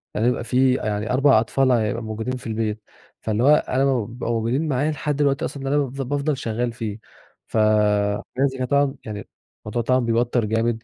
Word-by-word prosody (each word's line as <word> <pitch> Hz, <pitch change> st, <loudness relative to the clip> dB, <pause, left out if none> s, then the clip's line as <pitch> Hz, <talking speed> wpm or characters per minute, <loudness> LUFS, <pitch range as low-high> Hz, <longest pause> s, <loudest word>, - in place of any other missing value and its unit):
يعني 110 Hz, +3 st, +1 dB
يبقى 125 Hz, -1 st, 0 dB
في 130 Hz, +2 st, +3 dB
يعني 105 Hz, -1 st, -2 dB
4 135 Hz, -3 st, +5 dB
أطفال 130 Hz, +4 st, +1 dB
ع 120 Hz, -3 st, +3 dB
يبقوا 115 Hz, +2 st, -2 dB
موجودين 110 Hz, +3 st, -3 dB
في 125 Hz, -, -9 dB
البيت، 110 Hz, -1 st, -2 dB, 0.4 s
فاللي 110 Hz, +2 st, -1 dB
هو 150 Hz, +2 st, +7 dB
أنا 130 Hz, -2 st, 0 dB
لمّا 130 Hz, -6 st, +1 dB
بيبقوا 120 Hz, +1 st, -4 dB
موجودين 120 Hz, +7 st, 0 dB
معايا 145 Hz, +2 st, +1 dB
لحد 150 Hz, -1 st, -2 dB
الوقت 140 Hz, -1 st, +2 dB
أصلًا 140 Hz, -, -4 dB
اللي 135 Hz, +1 st, 0 dB
أنا 145 Hz, -, +3 dB
بافضَل 140 Hz, +2 st, -2 dB
شغّال 120 Hz, -1 st, -2 dB
فيه، 110 Hz, -2 st, -5 dB, 0.5 s
فلازم 105 Hz, +5 st, +1 dB
أنا 130 Hz, -, -1 dB
طبعًا 140 Hz, +1 st, +2 dB
يعني 105 Hz, -2 st, -6 dB, 0.4 s
الموضوع 105 Hz, +3 st, -2 dB
طبعًا 130 Hz, +2 st, +2 dB
بيوتّر 120 Hz, 0 st, +1 dB
جامد 115 Hz, +1 st, 0 dB
120 Hz, 190 wpm, -22 LUFS, 110-135 Hz, 0.5 s, هو